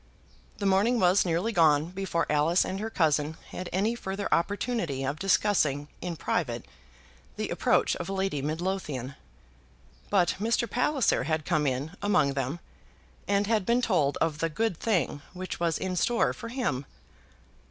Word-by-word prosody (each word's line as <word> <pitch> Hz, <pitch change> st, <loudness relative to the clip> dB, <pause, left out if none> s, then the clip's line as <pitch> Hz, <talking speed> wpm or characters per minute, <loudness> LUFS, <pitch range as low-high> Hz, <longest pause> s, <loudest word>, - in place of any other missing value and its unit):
The 200 Hz, -, -3 dB
morning 200 Hz, +5 st, +3 dB
was 185 Hz, +1 st, +4 dB
nearly 175 Hz, +7 st, 0 dB
gone 160 Hz, -3 st, +3 dB
before 185 Hz, -3 st, -1 dB
Alice 150 Hz, +4 st, +3 dB
and 190 Hz, +1 st, -3 dB
her 220 Hz, +2 st, -3 dB
cousin 155 Hz, -5 st, +1 dB
had 180 Hz, -, -6 dB
any 205 Hz, +5 st, +1 dB
further 200 Hz, -3 st, -4 dB
opportunity 175 Hz, -, -1 dB
of 140 Hz, +3 st, -3 dB
discussing 155 Hz, -7 st, +2 dB
in 175 Hz, -2 st, -3 dB
private 125 Hz, -8 st, -2 dB, 0.7 s
the -, -, -3 dB
approach -, -, +2 dB
of 180 Hz, -, -5 dB
Lady 190 Hz, -6 st, -1 dB
Midlothian; 155 Hz, -4 st, -3 dB, 1.0 s
but 185 Hz, -4 st, +2 dB
Mr. 230 Hz, +2 st, +1 dB
Palliser 250 Hz, -, +1 dB
had 155 Hz, -1 st, -1 dB
come 150 Hz, -1 st, +1 dB
in 135 Hz, +4 st, -2 dB
among 155 Hz, -9 st, +2 dB
them, 135 Hz, +4 st, -2 dB, 0.7 s
and 200 Hz, 0 st, +2 dB
had 215 Hz, -1 st, +1 dB
been 235 Hz, +5 st, +2 dB
told 150 Hz, -11 st, +2 dB
of 160 Hz, -2 st, 0 dB
the 165 Hz, -, 0 dB
good 220 Hz, +4 st, -1 dB
thing 170 Hz, -, 0 dB
which 185 Hz, 0 st, -6 dB
was 170 Hz, -2 st, +1 dB
in 185 Hz, -1 st, -3 dB
store 235 Hz, +6 st, +2 dB
for -, -, -8 dB
him. 230 Hz, -, -2 dB
180 Hz, 150 wpm, -28 LUFS, 150-205 Hz, 1.0 s, was